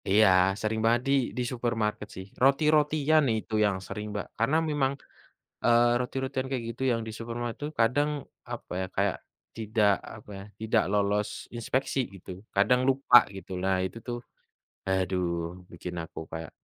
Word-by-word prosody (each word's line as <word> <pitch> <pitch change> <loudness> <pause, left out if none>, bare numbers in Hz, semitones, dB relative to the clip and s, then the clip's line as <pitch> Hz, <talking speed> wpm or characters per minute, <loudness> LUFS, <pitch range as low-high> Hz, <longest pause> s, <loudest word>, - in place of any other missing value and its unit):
Iya, 105 +2 +6 0.3
sering 110 +1 -1
banget 115 +1 +4
di - - +4 0.2
di 125 - +1
supermarket 115 -4 -1
sih. 95 - -7 0.2
Roti-rotian 150 +2 +4
itu 110 - -7
yang 100 -2 +1
sering, 105 +1 -5
Mbak, 105 - -4
karena 125 +8 +2
memang, 140 -3 +1 0.7
eee, 120 0 +5
roti-rotian 130 +1 -2
kayak 125 -3 -2
gitu 115 - -6
yang 115 - 0
di 110 - -5
supermarket 120 0 -4
tuh 150 - -2
kadang, 135 +6 +3 0.4
apa - - -7
ya, 95 - -1
kayak 100 0 +1 0.4
tidak, 110 -2 +2 0.2
apa 105 -1 -14
ya, 95 - -8 0.2
tidak 110 0 +2
lolos 105 0 +1 0.3
inspeksi 130 +4 -1 0.2
gitu, 95 0 -11 0.3
kadang 110 +6 +4
lupa 135 -2 +5 0.2
gitu. 95 - -10
Nah, 95 0 +2
itu 95 - -5
tuh 120 -1 -3 0.7
aduh 95 -1 +1 0.5
bikin 90 +1 -7
aku 80 - -10
kayak, 80 -1 -5
115 Hz, 155 wpm, -28 LUFS, 100-130 Hz, 0.7 s, Iya